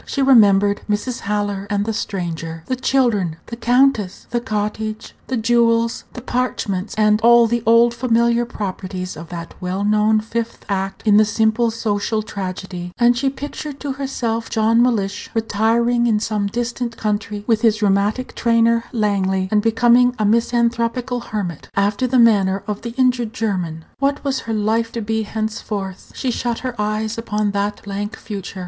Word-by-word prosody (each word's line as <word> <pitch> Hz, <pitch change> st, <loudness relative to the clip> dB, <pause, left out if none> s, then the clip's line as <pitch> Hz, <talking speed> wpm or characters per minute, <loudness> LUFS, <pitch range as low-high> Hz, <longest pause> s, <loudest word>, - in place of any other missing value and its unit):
She 275 Hz, -, 0 dB
remembered 205 Hz, -6 st, +5 dB
Mrs. 210 Hz, +4 st, -1 dB
Haller 205 Hz, -1 st, -2 dB
and 205 Hz, -1 st, 0 dB
the 225 Hz, -, -1 dB
Stranger, 165 Hz, -5 st, -4 dB
the 255 Hz, -, -1 dB
children, 240 Hz, -10 st, +1 dB
the 235 Hz, -, -7 dB
countess, 240 Hz, -4 st, +2 dB
the 240 Hz, -, +1 dB
cottage, 215 Hz, -1 st, -3 dB
the 260 Hz, -, -1 dB
jewels, 230 Hz, 0 st, +2 dB
the 245 Hz, -, -8 dB
parchments, 220 Hz, -6 st, -2 dB
and 210 Hz, 0 st, +3 dB
all 235 Hz, +1 st, +6 dB
the 235 Hz, +1 st, 0 dB
old 230 Hz, +1 st, +5 dB
familiar 235 Hz, -1 st, +2 dB
properties 185 Hz, -4 st, -5 dB
of 165 Hz, +1 st, -9 dB
that 170 Hz, -1 st, -7 dB
well 185 Hz, +2 st, -2 dB
known 215 Hz, +1 st, +3 dB
fifth 230 Hz, +1 st, -4 dB
act 195 Hz, -1 st, -3 dB
in 210 Hz, -1 st, +5 dB
the 215 Hz, -, +7 dB
simple 220 Hz, +2 st, +2 dB
social 215 Hz, -1 st, -1 dB
tragedy, 185 Hz, -3 st, -6 dB
and 240 Hz, 0 st, +4 dB
she 270 Hz, +3 st, +1 dB
pictured 285 Hz, +1 st, -7 dB
to 285 Hz, -, -3 dB
herself 245 Hz, -4 st, -3 dB
John 225 Hz, +1 st, +3 dB
Mellish 210 Hz, -5 st, 0 dB
retiring 230 Hz, +2 st, +2 dB
into 215 Hz, -1 st, +1 dB
some 210 Hz, -2 st, -1 dB
distant 235 Hz, +2 st, -3 dB
country 210 Hz, -1 st, -2 dB
with 225 Hz, -1 st, +2 dB
his 220 Hz, -1 st, +2 dB
rheumatic 205 Hz, +5 st, +1 dB
trainer 230 Hz, 0 st, +2 dB
Langley, 190 Hz, -4 st, 0 dB
and 210 Hz, -1 st, +3 dB
becoming 240 Hz, +2 st, +4 dB
a 215 Hz, -, 0 dB
misanthropical 235 Hz, +2 st, +1 dB
hermit, 205 Hz, -8 st, -5 dB
after 205 Hz, +5 st, +1 dB
the 255 Hz, +1 st, +1 dB
manner 200 Hz, -5 st, +4 dB
of 210 Hz, -1 st, -4 dB
the 235 Hz, 0 st, -6 dB
injured 250 Hz, -3 st, +1 dB
German. 180 Hz, -9 st, -3 dB
What 280 Hz, +1 st, 0 dB
was 275 Hz, -2 st, -1 dB
her 225 Hz, -, -4 dB
life 225 Hz, +2 st, 0 dB
to 230 Hz, -, -3 dB
be 220 Hz, +1 st, -1 dB
henceforth? 210 Hz, -3 st, -4 dB
She 260 Hz, -, -1 dB
shut 240 Hz, -1 st, -2 dB
her 255 Hz, -, -2 dB
eyes 215 Hz, +2 st, -2 dB
upon 210 Hz, -2 st, -1 dB
that 200 Hz, +1 st, -2 dB
blank 205 Hz, +1 st, -4 dB
future. 200 Hz, -2 st, -7 dB
220 Hz, 165 wpm, -20 LUFS, 205-235 Hz, -, the